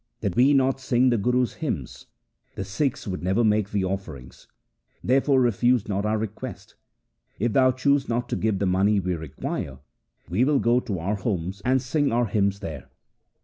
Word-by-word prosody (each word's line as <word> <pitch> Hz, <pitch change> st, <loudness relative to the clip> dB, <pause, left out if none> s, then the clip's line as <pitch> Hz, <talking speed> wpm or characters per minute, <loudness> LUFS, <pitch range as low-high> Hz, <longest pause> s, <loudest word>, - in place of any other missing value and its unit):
Did 100 Hz, -5 st, -2 dB
we 135 Hz, +4 st, +5 dB
not 135 Hz, 0 st, +2 dB
sing 130 Hz, -1 st, +2 dB
the 120 Hz, -, +2 dB
Guru's 125 Hz, +3 st, +1 dB
hymns, 90 Hz, -, -4 dB, 0.5 s
the -, -, -3 dB
Sikhs 120 Hz, +8 st, -2 dB
would 90 Hz, -2 st, -4 dB
never 95 Hz, +6 st, +1 dB
make 105 Hz, -2 st, +2 dB
thee 100 Hz, -2 st, -1 dB
offerings. 85 Hz, -10 st, -6 dB, 0.6 s
Therefore 135 Hz, +2 st, +3 dB
refuse 120 Hz, -1 st, +2 dB
not 100 Hz, 0 st, -1 dB
our 110 Hz, +1 st, +1 dB
request. 110 Hz, -1 st, -6 dB, 0.6 s
If 115 Hz, +2 st, 0 dB
thou 130 Hz, -1 st, +5 dB
choose 140 Hz, +1 st, +1 dB
not 120 Hz, +1 st, -1 dB
to -, -, -1 dB
give 110 Hz, -2 st, 0 dB
the 100 Hz, -, -1 dB
money 95 Hz, +3 st, +2 dB
we 90 Hz, -1 st, -1 dB
require, 70 Hz, -4 st, -5 dB, 0.5 s
we 95 Hz, +8 st, +1 dB
will 145 Hz, +2 st, +3 dB
go 120 Hz, -1 st, +3 dB
to 110 Hz, -7 st, -4 dB
our 95 Hz, +6 st, -2 dB
homes 95 Hz, -2 st, -3 dB
and 130 Hz, +2 st, +3 dB
sing 140 Hz, +3 st, 0 dB
our 120 Hz, +1 st, +2 dB
hymns 100 Hz, -2 st, 0 dB
there.' 75 Hz, -8 st, -7 dB
105 Hz, 180 wpm, -25 LUFS, 95-125 Hz, 0.6 s, we